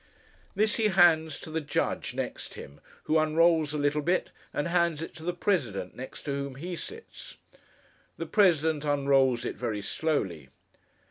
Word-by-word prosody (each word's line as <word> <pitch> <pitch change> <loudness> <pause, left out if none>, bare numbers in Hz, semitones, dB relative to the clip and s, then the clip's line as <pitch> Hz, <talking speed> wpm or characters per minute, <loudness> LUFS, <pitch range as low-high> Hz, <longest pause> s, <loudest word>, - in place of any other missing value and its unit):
This 210 +2 +2
he 220 -2 +3
hands 165 -5 +4
to 155 - -8
the 160 +1 -1
judge 145 - -2
next - - -4
him, 70 +1 -10 0.2
who 160 +1 +2
unrolls 160 0 +3
a 150 - -2
little 145 +1 +1
bit, 175 +5 0 0.2
and 145 - -2
hands 170 -2 +1
it - - -8
to 160 - -10
the 175 - 0
President, 120 - -1
next 130 +1 -8
to 145 - -3
whom 140 -1 -3
he 175 +6 -5
sits. 450 - -9 0.8
The - - -4
President 160 -7 +3
unrolls 135 -4 +2
it, - - -4
very 110 -4 -3
slowly. 95 - -2
155 Hz, 160 wpm, -28 LUFS, 140-170 Hz, 0.8 s, hands